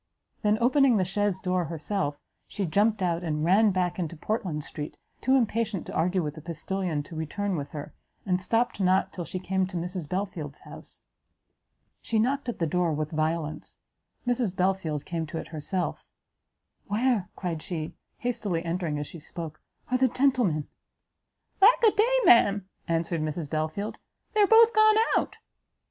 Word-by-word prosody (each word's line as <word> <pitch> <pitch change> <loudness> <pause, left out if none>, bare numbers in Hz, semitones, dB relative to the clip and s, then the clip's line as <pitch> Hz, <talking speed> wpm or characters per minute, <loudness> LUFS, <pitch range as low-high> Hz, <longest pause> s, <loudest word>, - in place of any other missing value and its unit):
then, 210 -1 +3
opening 255 0 +4
the 185 - +2
chaise 200 0 0
door 180 -2 0
herself, 155 -1 -2 0.3
she 200 - -3
jumpt 205 +4 +2
out, 170 -1 0
and 155 -2 -1
ran 205 +5 +5
back 185 -2 0
into 170 -1 -3
Portland 180 -5 -2
street, 150 0 -7 0.2
too 260 +2 +3
impatient 230 -5 0
to - - -7
argue 180 +3 +1
with 150 -1 -3
the 155 - -10
postilion 170 0 -3
to 160 - -11
return 185 +5 -2
with 145 -3 -4
her, 145 0 -7 0.3
and 180 -1 +1
stopt 230 +3 +1
not 190 0 +2
till 175 - -5
she 185 - -5
came 190 0 0
to 185 -1 -5
Mrs 175 -2 -4
Belfield's 180 -7 -4
house. - - -10 1.0
She 225 - -1
knocked 255 +4 +1
at 240 - -3
the 165 - 0
door 175 +1 +1
with 150 0 -2
violence; 155 0 -2 0.5
Mrs 245 -6 0
Belfield 180 -6 0
came 165 -2 -3
to 160 - -5
it 165 - -6
herself; 165 +3 -3 0.8
"Where," 215 -2 +1
cried 170 -4 -3
she, 160 -3 -4 0.2
hastily 205 -8 -2
entering 165 -3 -1
as 145 - -3
she 165 - -10
spoke, 160 0 -7 0.3
"are 255 - +2
the 260 - +5
gentlemen?" 245 - +1 0.9
"Lack 455 +5 +7
a 440 - +7
day! 460 +5 +3
ma'am," 205 - +5 0.2
answered 165 0 0
Mrs 155 -1 -3
Belfield, 155 +7 -2 0.3
"they 430 - +3
are 405 - +6
both 455 +1 +7
gone 435 0 +6 0.2
out." - - 0
180 Hz, 165 wpm, -27 LUFS, 160-215 Hz, 1.0 s, Lack